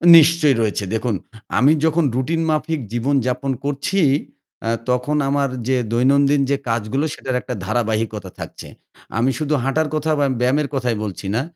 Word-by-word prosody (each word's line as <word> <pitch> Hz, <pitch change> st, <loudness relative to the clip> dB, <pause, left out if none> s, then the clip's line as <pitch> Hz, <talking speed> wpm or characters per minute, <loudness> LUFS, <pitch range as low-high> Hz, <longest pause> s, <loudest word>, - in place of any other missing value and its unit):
নিশ্চয়ই 155 Hz, -3 st, +6 dB
রয়েছে। 105 Hz, -1 st, 0 dB
দেখুন, 110 Hz, -1 st, 0 dB, 0.4 s
আমি 135 Hz, +6 st, +5 dB
যখন 160 Hz, +1 st, +2 dB
রুটিন 160 Hz, +6 st, 0 dB
মাফিক 155 Hz, +1 st, 0 dB
জীবনযাপন 130 Hz, +1 st, 0 dB
করছি, 145 Hz, +7 st, -1 dB, 0.7 s
আ -, -, +2 dB, 0.2 s
তখন 125 Hz, +4 st, +1 dB
আমার 140 Hz, -1 st, +1 dB, 0.2 s
যে 130 Hz, -1 st, +2 dB
দৈনন্দিন 140 Hz, +4 st, +3 dB
যে 140 Hz, -, +3 dB
কাজগুলো 115 Hz, +6 st, 0 dB
সেটার 130 Hz, -1 st, -4 dB
একটা 125 Hz, -, -5 dB
ধারাবাহিকতা 110 Hz, -3 st, -1 dB
থাকছে। -, -, -8 dB, 0.5 s
আমি 125 Hz, +3 st, +2 dB
শুধু 150 Hz, 0 st, 0 dB
হাঁটার 150 Hz, +4 st, +1 dB
কথা 155 Hz, +1 st, 0 dB
বা 140 Hz, -, +3 dB
ব্যায়ামের 140 Hz, +4 st, +2 dB
কথাই 125 Hz, -4 st, 0 dB
বলছি 100 Hz, -1 st, -5 dB
না। 120 Hz, -, +2 dB
135 Hz, 150 wpm, -20 LUFS, 120-150 Hz, 0.7 s, নিশ্চয়ই